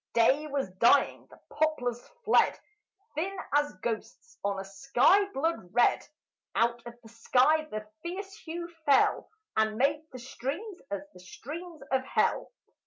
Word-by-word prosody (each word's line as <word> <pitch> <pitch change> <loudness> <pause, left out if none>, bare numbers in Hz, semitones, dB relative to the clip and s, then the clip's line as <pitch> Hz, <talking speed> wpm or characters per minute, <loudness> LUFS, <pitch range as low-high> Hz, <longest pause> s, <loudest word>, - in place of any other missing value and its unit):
Day 265 +6 +3
was 275 -8 -2
dying; 270 +5 +4
the - - -17
poplars 270 -6 0 0.2
fled, 445 - +4 0.5
Thin 375 +6 -2 0.2
as 290 0 +3
ghosts, 235 - -5
on 200 -1 -1
a 195 - -5
sky 270 - +3
blood 325 - -2
red; 245 - +3 0.5
Out 235 +1 +2
of 235 0 -10
the 225 - -14
sky 255 +7 +3
the 215 -7 -6 0.2
fierce 385 +3 -6
hue 340 -3 -6 0.2
fell, 275 -2 +4 0.3
And 220 0 +1
made 285 +4 +2
the 255 - -8
streams 280 - -5
as 200 - -3
the - - -14
streams 310 - -9
of 265 -1 +2
hell. - - 0
275 Hz, 145 wpm, -29 LUFS, 235-320 Hz, 0.5 s, dying